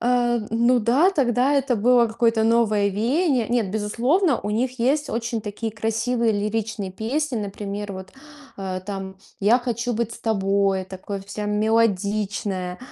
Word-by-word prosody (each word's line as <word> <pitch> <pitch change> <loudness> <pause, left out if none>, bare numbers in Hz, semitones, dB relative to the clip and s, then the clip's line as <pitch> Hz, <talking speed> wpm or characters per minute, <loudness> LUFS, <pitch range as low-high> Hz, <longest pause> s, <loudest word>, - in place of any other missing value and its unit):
А, 240 0 +2
ну 235 +2 +3
да, 260 - +3
тогда 265 -4 +2
это 270 -2 +2
было 235 +2 +4
какое-то 225 0 +1
новое 220 -3 +3
веяние. 245 - +1
Нет, 235 -5 0
безусловно, 240 - +1
у 205 - -4
них 250 +4 -1
есть 285 +5 +1
очень 230 0 -2
такие 210 +2 -5
красивые 225 +2 0
лиричные 210 -1 -2
песни, 260 +6 -2
например, 205 -1 -5
вот, 185 0 -9 0.5
а, 190 -1 -4
там, 190 0 -6 0.2
"Я 220 +5 +4
хочу 240 -1 -2
быть 230 0 -2
с - - -9
тобой", 195 -3 +1
такое 190 +1 -7
вся 210 +1 -5
мелодичная, 205 -3 0
225 Hz, 145 wpm, -23 LUFS, 205-245 Hz, 0.5 s, было